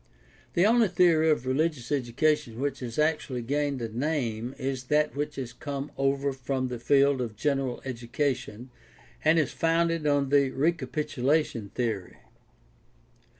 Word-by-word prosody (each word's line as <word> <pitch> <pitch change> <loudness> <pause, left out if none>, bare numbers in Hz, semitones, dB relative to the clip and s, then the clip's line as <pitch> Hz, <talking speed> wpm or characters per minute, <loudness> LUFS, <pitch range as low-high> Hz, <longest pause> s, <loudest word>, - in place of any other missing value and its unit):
— - - -30
The 175 - +4
only 230 +1 +5
theory 170 -3 +4
of 150 -5 +1
religious 135 -1 -1
education 140 -1 0
which 140 0 -2
has 120 -3 -6
actually 150 -5 0
gained 140 0 -1
a 110 -1 -5
name 125 -4 -2
is 130 -2 -3
that 150 +2 +1
which 150 +1 -3
has 125 -3 -5
come 140 +2 -5
over 135 0 0
from 130 0 -2
the 125 -1 -5
field 140 +1 +3
of 115 -3 -4
general 135 0 -1
education 125 0 -3 0.5
and 155 +1 +4
is 155 -4 +2
founded 165 -1 +1
on 145 -2 +2
the 140 -1 +4
recapitulation 150 -5 0
theory. 110 -7 -2
140 Hz, 145 wpm, -27 LUFS, 125-150 Hz, 0.5 s, only